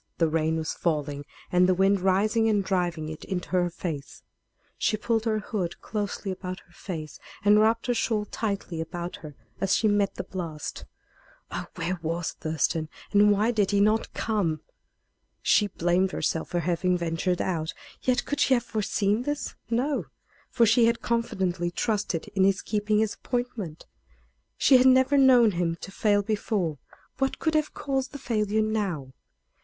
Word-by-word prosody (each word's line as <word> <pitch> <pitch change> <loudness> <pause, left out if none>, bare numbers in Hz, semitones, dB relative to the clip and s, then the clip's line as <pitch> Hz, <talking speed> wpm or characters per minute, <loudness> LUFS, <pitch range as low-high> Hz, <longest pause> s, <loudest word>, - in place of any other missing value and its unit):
The 165 - +3
rain 160 0 +1
was 160 -1 -2
falling 145 -3 -2 0.3
and 180 +1 +4
the 185 - +4
wind 195 +2 +3
rising 215 +4 +2
and 205 -2 +2
driving 175 -5 -1
it 155 0 -7
into 180 -2 -4
her 180 -1 +2
face. 160 -5 -6 0.6
She 215 - +1
pulled 225 +1 0
her 220 -1 +1
hood 200 -4 -3
closely 205 -2 -3
about 185 0 -6
her - - -26
face, 160 -5 -7 0.3
and 210 +1 +6
wrapped 225 +2 +3
her 245 - +1
shawl 220 -2 0
tightly 200 -6 -3
about 175 +2 -5
her 150 -3 -10 0.2
as 195 0 +2
she 220 - +2
met 205 -1 +2
the - - -4
blast. 165 -5 -6 0.7
Oh! - - -4
where 180 +1 -2
was 165 +1 -2
Thurston, 155 0 -1 0.2
and 205 0 +6
why 210 +3 +3
did 210 -4 +1
he 205 - +2
not 215 +2 +2
come? 185 -9 0 0.8
She 210 - +4
blamed 180 0 +1
herself 160 - -1
for 175 - 0
having 180 +2 +1
ventured 170 +1 -1
out; 160 -4 -1 0.3
yet 255 -1 +1
could 290 - -3
she 270 - +4
have 240 - 0
foreseen 210 0 0
this? 290 +3 -3 0.2
No; 260 +5 0 0.4
for 235 - +3
she 230 +2 +5
had 235 0 0
confidently 190 -7 0
trusted 200 -2 -1
in 195 -2 +1
his 195 0 +2
keeping 210 0 0
his 215 -1 +1
appointment. 240 -10 -4 0.7
She 265 - +6
had 255 +1 +5
never 260 +2 +5
known 255 -5 +6
him 170 -2 -1
to 195 - -7
fail 205 0 +2
before. 200 - -1 0.4
What 270 0 0
could 315 - 0
have 305 -1 0
caused 270 -1 -2
the - - -5
failure 215 -4 0
now? 190 -12 -2
200 Hz, 170 wpm, -27 LUFS, 175-220 Hz, 0.8 s, and